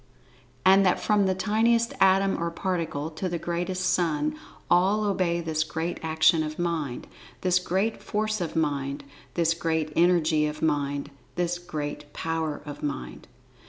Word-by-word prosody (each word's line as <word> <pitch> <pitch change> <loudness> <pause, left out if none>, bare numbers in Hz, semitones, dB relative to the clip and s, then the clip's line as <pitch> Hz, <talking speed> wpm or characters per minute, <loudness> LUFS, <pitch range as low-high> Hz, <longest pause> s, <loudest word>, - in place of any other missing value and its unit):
And 195 +1 +7
that 180 -2 +3
from 205 -2 +2
the 190 - +1
tiniest 225 +4 +2
atom, 195 -1 +4
or 170 - 0
particle, 165 -3 -2
to 185 +4 -3
the 175 - -2
greatest 175 +2 -2
Sun—all 175 +5 +1
obey 185 -4 +1
this 160 -1 0
Great 160 +2 -3
Action 160 +1 +3
of 155 0 -4
Mind—this[Pg 170 +3 -2
29] 195 +5 +1
Great - - -16
Force 215 -1 -1
of 170 - -3
Mind—this 145 +2 -1
Great 160 -2 -1
Energy 165 -3 +3
of 150 +1 -5
Mind—this 145 +3 -2
Great 150 -4 -5
Power 160 -2 -3
of 145 -1 -8
Mind. 60 - -5
165 Hz, 135 wpm, -26 LUFS, 150-185 Hz, -, And